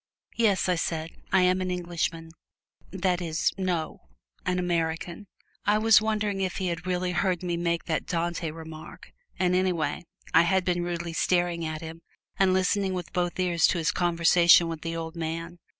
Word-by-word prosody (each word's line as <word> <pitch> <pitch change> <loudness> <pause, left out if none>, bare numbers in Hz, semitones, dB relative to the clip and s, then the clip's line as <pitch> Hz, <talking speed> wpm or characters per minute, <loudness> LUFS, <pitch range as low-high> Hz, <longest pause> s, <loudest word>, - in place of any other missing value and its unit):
"Yes," 210 -6 +2
I 180 - +3
said; 165 -1 -2 0.2
"I 190 -1 +4
am 185 +1 +3
an 185 - -2
Englishman 170 -2 -3 0.6
that 185 -1 -1
is, 165 -1 0
no 180 -4 -2 0.5
an 180 0 +1
American!" 170 +2 -2 0.4
I 210 +1 +3
was 220 0 +6
wondering 210 -2 -1
if 185 -1 -1
he 185 -2 -1
had 170 +1 -4
really 180 0 0
heard 180 0 0
me 175 -1 -1
make 170 0 -1
that 160 -3 -2
Dante 170 -1 -2
remark; 160 0 -10 0.3
and 180 -1 +1
anyway, 175 -5 0 0.3
I 165 - +7
had 185 +1 +2
been 175 -1 +1
rudely 170 -1 -4
staring 175 -1 +1
at 155 0 -4
him 165 0 -8 0.4
and 190 -1 +4
listening 190 +1 +1
with 180 -2 -6
both 175 0 -1
ears 175 -3 +3
to - - 0
his 165 -1 +1
conversation 170 0 +5
with 165 -1 -5
the 165 0 -4
old 165 0 -5
man. 165 +1 -5
175 Hz, 175 wpm, -27 LUFS, 165-185 Hz, 0.6 s, I